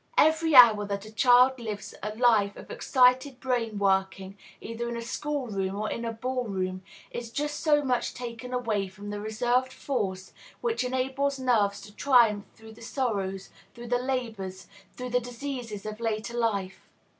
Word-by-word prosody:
Every 315 0 +4
hour 225 -5 +9
that 200 0 -4
a 215 - -12
child 250 +2 +5
lives 215 -3 -6
a 210 +1 -4
life 220 -4 +3
of - - -11
excited 260 - +3
brain 240 -4 -1
working, 190 -1 0 0.2
either 235 +1 -5
in 235 - -4
a - - -4
school 290 +3 -3
room 195 -3 -2
or 215 +1 -2
in 235 - -4
a 230 - -2
ball 250 +2 -3
room, 185 -3 -3 0.3
is 240 -1 -5
just 295 +5 -3
so 295 -2 +3
much 250 -3 -1
taken 245 0 -7
away 225 -6 -1
from 200 +2 -9
the 205 0 -4
reserved 240 +4 0
force 195 -10 -3 0.3
which 460 - -1
enables 265 +2 -1
nerves 220 -6 +1
to 205 +1 -13
triumph 235 -7 +4
through 220 0 -13
the 225 - -16
sorrows, 200 -7 -3 0.2
through 235 0 -9
the 245 0 +2
labors, 225 -8 -4 0.3
through 250 0 -5
the 250 - +3
diseases 245 -3 -6
of 215 0 -6
later 225 0 -2
life. 200 -5 -2
235 Hz, 170 wpm, -27 LUFS, 205-255 Hz, 0.3 s, hour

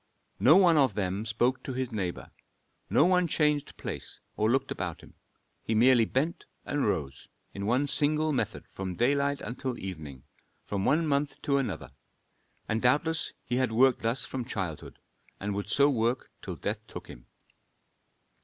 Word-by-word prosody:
No 150 +6 +7
one 180 -4 +6
of 130 -8 +3
them 100 +2 -2
spoke 120 +4 +1
to 130 - -5
his 130 -1 -3
neighbor, 95 -5 -4 0.6
no 150 - +5
man 180 -1 +3
changed 150 -2 +1
place - - -6 0.2
or 110 +1 +1
looked 135 +2 +1
about 85 -2 -4
him; - - -16 0.5
he 110 - -2
merely 120 +1 +5
bent 145 +9 -1 0.2
and 145 -4 0
rose 70 -9 -3 0.3
in 100 0 -4
one 125 +5 +2
single 150 +2 +2
method 110 -5 -2
from 95 -1 -5
daylight 140 +4 +1
until 125 0 -4
evening, 75 -8 -7 0.4
from 100 -1 -2
one 155 +5 +3
month 140 -1 0
to 140 -1 +2
another, 80 - -4 0.8
and 110 0 -1
doubtless 150 +5 +2
he 120 - -1
had 130 -3 +1
worked 125 +2 +4
thus 115 +3 0
from 130 -2 -4
childhood 95 - -5 0.4
and 100 +1 -3
would 100 0 -4
so 140 +6 +4
work 120 -2 0
till - - -6
death - - -3
took - - -8
him. - - -12
125 Hz, 165 wpm, -29 LUFS, 100-140 Hz, 0.8 s, No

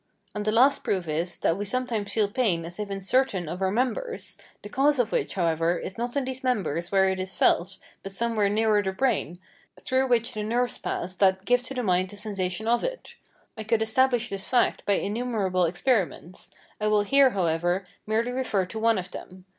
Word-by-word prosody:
And 210 -1 -4
the 215 - +2
last 260 +5 +4
proof 185 -4 -1
is, 165 +3 -2
that 165 - +2
we 205 - -3
sometimes 225 -1 -2
feel 215 -2 +2
pain 200 -7 0
as 175 +4 -8
if 210 -1 -4
in 195 0 -4
certain 195 -4 +1
of 175 +4 -5
our 190 - +2
members, 255 - -2 0.3
the - - -6
cause 285 +5 +2
of 240 -3 +1
which, - - -1
however, 170 -1 +1
is 185 - -6
not 240 +3 -3
in 275 - 0
these 260 +1 -6
members 175 - -1
where 190 -1 +4
it 190 0 -1
is 185 0 -4
felt, 185 +2 +2 0.2
but 195 - -7
somewhere 215 0 0
nearer 215 0 +2
the 190 -1 -2
brain, 190 - 0 0.4
through 260 +1 0
which 235 -2 +1
the 215 - -3
nerves 240 +3 -1
pass 185 +2 -3
that 190 0 +2
give 245 +2 +3
to 265 +2 -7
the 250 - -2
mind 185 -2 +1
the 205 - -11
sensation 200 0 -3
of 240 +1 +2
it. - - -5 0.4
I 220 - -6
could 220 0 +1
establish 245 +1 +2
this 195 -1 -4
fact 250 - +1
by 200 - +4
innumerable 205 -4 0
experiments; 185 -1 -1 0.3
I 215 - 0
will 210 -1 +3
here, 275 +5 +5
however, 175 +2 0 0.2
merely 225 +3 0
refer 250 -7 0
to 220 +4 -7
one 225 -1 +3
of 180 -1 -5
them. 185 0 -10
210 Hz, 210 wpm, -26 LUFS, 185-245 Hz, 0.4 s, here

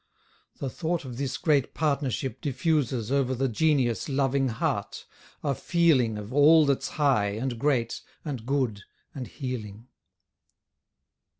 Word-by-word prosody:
The 135 - -4
thought 165 0 -2
of 125 -2 -7
this 135 -1 -2
great 145 -5 +1
partnership 140 -5 -1
diffuses 135 -5 0
Over 135 -2 +1
the 135 +2 0
genius 130 -1 +1
loving 135 0 +1
heart, 115 -2 -2 0.4
a 140 - +1
feeling 135 -9 +2
Of 105 +3 -7
all 150 +2 +6
that's 140 -2 +1
high, 130 -9 +2
and 120 +2 -3
great, 125 -4 0 0.2
and 135 -7 -4
good, 125 -5 -1 0.3
and 130 -4 -6
healing. 115 -3 -6
135 Hz, 125 wpm, -27 LUFS, 120-145 Hz, 0.4 s, all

